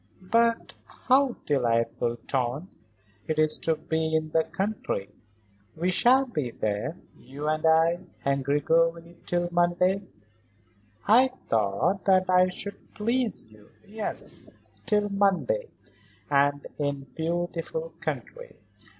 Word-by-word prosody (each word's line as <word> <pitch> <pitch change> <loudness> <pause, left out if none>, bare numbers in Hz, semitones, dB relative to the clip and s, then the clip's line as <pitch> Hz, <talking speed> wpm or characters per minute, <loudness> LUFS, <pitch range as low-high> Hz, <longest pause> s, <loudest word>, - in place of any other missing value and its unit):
"But 230 0 +2 0.3
how 265 -1 +4
delightful, 120 -3 +1
Tante. 135 +7 -2 0.5
It 155 - -1
is 155 0 +2
to 160 - +1
be 160 0 -1
in 155 0 -1
the 160 0 +3
country? 195 - -3 0.6
We 175 +3 0
shall 255 +8 +4
be 150 - -3
there, 105 -3 -3 0.2
you 140 +4 -7
and 155 0 0
I 165 +2 +4 0.3
and 140 0 +1
Gregory, 165 +4 +1
till 175 0 0
Monday?" 175 +2 +2 1.1
"I 245 +5 +7 0.2
thought 110 - +1
that 190 -2 +4
I 180 0 +5
should 200 +2 -8
please 235 +2 0
you. 105 -1 -18 0.2
Yes; 215 +1 -3 0.4
till 210 -1 +2
Monday. 200 - +1 0.6
And 145 0 +2
in 140 -2 -2
beautiful 175 - -3
country. - - -6
170 Hz, 115 wpm, -27 LUFS, 145-200 Hz, 1.1 s, I